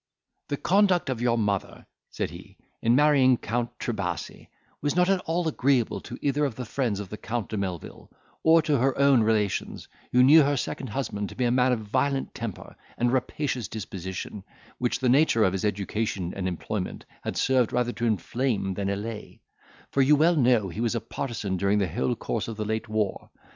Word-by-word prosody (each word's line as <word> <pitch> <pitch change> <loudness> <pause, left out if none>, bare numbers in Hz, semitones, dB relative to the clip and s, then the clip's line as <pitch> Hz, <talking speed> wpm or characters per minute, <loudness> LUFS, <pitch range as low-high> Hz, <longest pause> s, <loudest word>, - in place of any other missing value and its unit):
"The 145 - -2
conduct 185 -5 +3
of 120 -3 -3
your 120 -1 +2
mother," 105 -3 -2 0.2
said - - -3
he, - - -12 0.2
"in 115 +1 +3
marrying 135 -3 +5
Count 120 +2 -2
Trebasi, 100 -7 -4 0.3
was 145 +2 0
not 180 +1 +3
at 195 - +2
all 165 +1 0
agreeable 135 -5 +1 0.2
either 145 0 +1
to 115 - -13
the 125 - -5
friends 115 -3 -1
of 100 -2 -6
the 105 - -6
Count 115 -2 -3
de 110 - -3
Melvil, 95 -5 -5 0.3
or 160 0 +5
to 150 -4 +1
her 130 +1 +1
own 140 -3 +5
relations, 105 -3 0 0.2
who 125 0 +5
knew 150 +5 +8
her 145 0 +2
second 130 - -3
husband 105 -4 -3
to - - -11
be 125 - 0
a 120 - +2
man 125 +1 +3
of 120 -3 0
a - - -8
violent 135 +5 -1
temper, 115 -5 -7 0.2
and 120 +1 +1
rapacious 130 -2 -1
disposition, 95 -1 -6 0.4
which 125 -1 0
the 130 - +2
nature 125 -3 +4
of 95 - +2
his 95 - -2
education 100 -2 -2
and 95 -1 -2
employment 90 +2 -4 0.2
had - - -4
served 130 -3 +2
rather 125 -1 0
to 120 0 -2
inflame 110 0 -1
than 100 +1 -2
allay; 105 +2 -5 0.5
for 140 - +2
you 140 +3 +6
well 165 +4 +4
know 120 -8 +3
he 100 +6 -5
was 120 0 0
a - - +1
partisan 105 -7 -4
during 100 +3 +2
the 100 -2 +1
whole 65 -5 -1
course - - -3
of 115 -2 -6
the 105 - -2
late 110 0 -2
war. 110 -2 -2
120 Hz, 195 wpm, -26 LUFS, 105-135 Hz, 0.5 s, knew